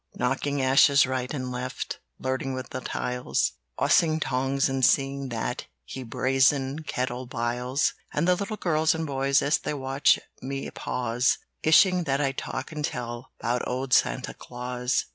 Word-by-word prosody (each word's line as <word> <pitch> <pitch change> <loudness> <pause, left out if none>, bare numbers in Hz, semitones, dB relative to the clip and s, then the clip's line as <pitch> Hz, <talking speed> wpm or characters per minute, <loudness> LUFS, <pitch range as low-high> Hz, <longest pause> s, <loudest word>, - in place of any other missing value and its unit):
"Knocking 135 +2 0
ashes 135 +1 +6
right 130 -1 -2
and 130 -4 -3
left, 125 +1 -4 0.2
Flirting 130 0 -2
with 130 -1 -6
the 130 - -4
tiles; 125 0 -1 0.3
Bossing 160 -1 +3
tongs 135 0 +1
and 135 -1 -2
seeing 135 +1 +2
that 115 - -3 0.3
The 130 - -5
brazen 130 +3 +1
kettle 125 -3 -3
biles. 125 +3 0 0.2
"And 150 +4 0
the 180 - +6
little 200 +4 -3
girls 160 -3 +2
and 160 0 -2
boys 135 -1 +2
As 145 - +2
they 150 - -3
watch 135 0 +3 0.2
me 135 +1 -4
pause, 125 0 0 0.3
Wishing 180 +2 +5
that 135 -1 +1
I'd 135 -2 0
talk 130 - -5
and 150 -1 -5
tell 120 -2 -4
'Bout 120 +1 0
old 125 +1 -2
Santa - - +2
Claus! 125 +1 -2
135 Hz, 155 wpm, -26 LUFS, 125-140 Hz, 0.3 s, ashes